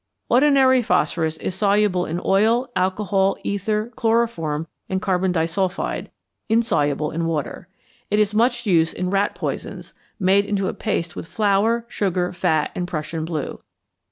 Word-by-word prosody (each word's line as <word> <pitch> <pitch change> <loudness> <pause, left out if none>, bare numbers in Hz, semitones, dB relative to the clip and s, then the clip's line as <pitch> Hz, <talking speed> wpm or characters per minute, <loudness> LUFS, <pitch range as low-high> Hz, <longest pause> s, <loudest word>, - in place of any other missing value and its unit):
Ordinary 260 -1 +5
phosphorus 160 -6 0
is 185 - -3
soluble 200 -2 +2
in 165 +2 -2
oil, 225 +6 +2
alcohol, 190 +1 +1
ether, 210 +3 -1
chloroform, 225 -10 0 0.2
and 190 - 0
carbon 185 -1 0
disulphide; 180 +2 -1 0.4
insoluble 150 - +1
in 165 +1 -2
water. 160 +1 -3 0.4
It 210 - +1
is 210 0 +2
much 240 +2 +2
used 165 -5 +2
in 180 0 -2
rat 200 +1 +1
poisons, - - -5 0.3
made 195 +1 +3
into 200 -2 -1
a - - -2
paste 170 -6 -2
with - - -7
flour, 215 +3 +1
sugar, 180 -5 -1
fat, 160 -3 0
and 180 - -3
Prussian 160 -1 -4
blue. 160 -4 -4
190 Hz, 140 wpm, -22 LUFS, 170-215 Hz, 0.4 s, Ordinary